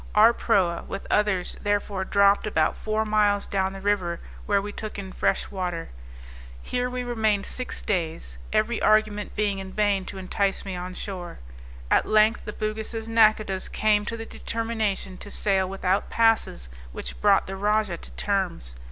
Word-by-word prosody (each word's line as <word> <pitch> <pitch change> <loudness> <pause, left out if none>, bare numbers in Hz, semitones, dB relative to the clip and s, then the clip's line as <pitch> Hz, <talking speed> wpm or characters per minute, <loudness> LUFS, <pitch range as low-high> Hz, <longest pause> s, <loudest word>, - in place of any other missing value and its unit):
Our 220 +3 +7
proa, 185 -8 +1
with 195 - -6
others, 205 -4 +1
therefore 205 -2 -1
dropped 200 +1 +4
about 155 -7 +2
four 215 0 -1
miles 210 -1 +2
down 190 -1 0
the 195 - -8
river, 190 -4 0 0.3
where 205 -1 +3
we 205 +1 -5
took 215 +1 -6
in 190 -2 -6
fresh - - 0
water. 180 -4 -3 0.7
Here 250 - -2
we 250 0 -3
remained 220 -4 +1
six 255 - -5
days, 160 - -2
every 220 +2 +1
argument 215 -1 +2
being 205 -2 0
in 190 0 -7
vain 205 -2 +1
to 195 - -7
entice 195 +1 -1
me 190 -2 -4
on 180 +1 -6
shore. 180 -4 -6 0.5
At - - +4
length 215 +2 +3
the 210 - -5
Bugis' 220 +1 -3
nacodahs 215 -4 +3
came 210 -1 +2
to 230 - -3
the 225 - -6
determination 220 -5 -3
to 205 - -9
sail 190 -2 +1
without 190 0 0
passes, 225 - +2 0.2
which - - -6
brought - - +5
the 195 - -5
rajah 205 -2 +1
to - - -13
terms. 185 - -2
205 Hz, 165 wpm, -25 LUFS, 190-215 Hz, 0.7 s, Our